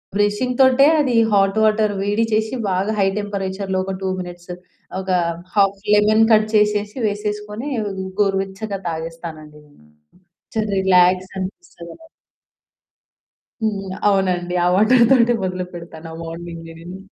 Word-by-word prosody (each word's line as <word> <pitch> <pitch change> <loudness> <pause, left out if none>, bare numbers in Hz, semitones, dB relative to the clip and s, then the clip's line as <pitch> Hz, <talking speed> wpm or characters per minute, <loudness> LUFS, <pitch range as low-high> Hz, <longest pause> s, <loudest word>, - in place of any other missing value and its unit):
బ్రషింగ్‌తోటే 250 +6 +3
అది 260 -5 +1 0.2
hot 195 +1 +3
water 215 -1 +2
వేడి 205 +3 +1
చేసి 220 +3 0
బాగా 190 +3 0
హై 195 - +3
టెంపరేచర్‌లో 195 -1 -3
ఒక 195 - -3
2 190 - -1
మినిట్స్ 175 0 -9 0.5
ఒక 190 0 -4 0.4
హాఫ్ 195 -1 +2
లెమన్ 215 +1 +4
కట్ 215 0 +5
చేసేసి, 210 +1 +1
వేసేసుకొని 210 +4 -4 0.5
గోరువెచ్చగా 195 +1 -1
తాగేస్తానండి 160 -2 -7
నేను. 145 - -23 1.0
రిలాక్స్ 185 0 +4
అనిపిస్తుంది. 190 - -9 1.6
హ్మ్. 195 -3 -2 0.2
అవునండి. 180 -3 +1
ఆ - - +3
వాటర్ 235 +5 +5
తోటే 240 -2 +5
మొదలు 185 0 -3
పెడతాను 165 -1 -10
ఆ - - -8
మార్నింగ్ 165 0 -8
నేను. 175 +3 -9
195 Hz, 115 wpm, -20 LUFS, 180-215 Hz, 1.6 s, కట్